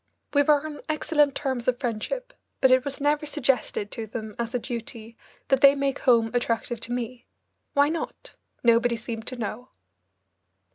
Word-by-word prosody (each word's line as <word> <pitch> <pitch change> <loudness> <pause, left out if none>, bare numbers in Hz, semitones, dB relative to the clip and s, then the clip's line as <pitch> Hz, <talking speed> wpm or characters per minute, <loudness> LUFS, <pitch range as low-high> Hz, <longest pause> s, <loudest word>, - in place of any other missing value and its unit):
We 285 - +5
were 290 +1 +3
on 305 -1 -6
excellent 300 -2 +2
terms 260 -4 -2
of 250 -1 +2
friendship, 265 - -3 0.3
but 265 - +5
it 255 0 +5
was 280 -1 -3
never 295 +1 +1
suggested 260 -7 0
to 225 -1 -5
them 215 -1 -6
as 230 -1 -2
a - - +4
duty 230 -2 -6 0.3
that 270 -1 +3
they 280 -1 +8
make 275 -1 -1
home 230 -3 +4
attractive 240 -1 -1
to 230 - -5
me. 245 0 -4 0.5
Why 285 +1 +4
not? 330 +1 -5 0.3
Nobody 235 0 +4
seemed 225 0 -6
to 255 - -3
know. 240 +2 -5
250 Hz, 170 wpm, -26 LUFS, 230-285 Hz, 0.5 s, they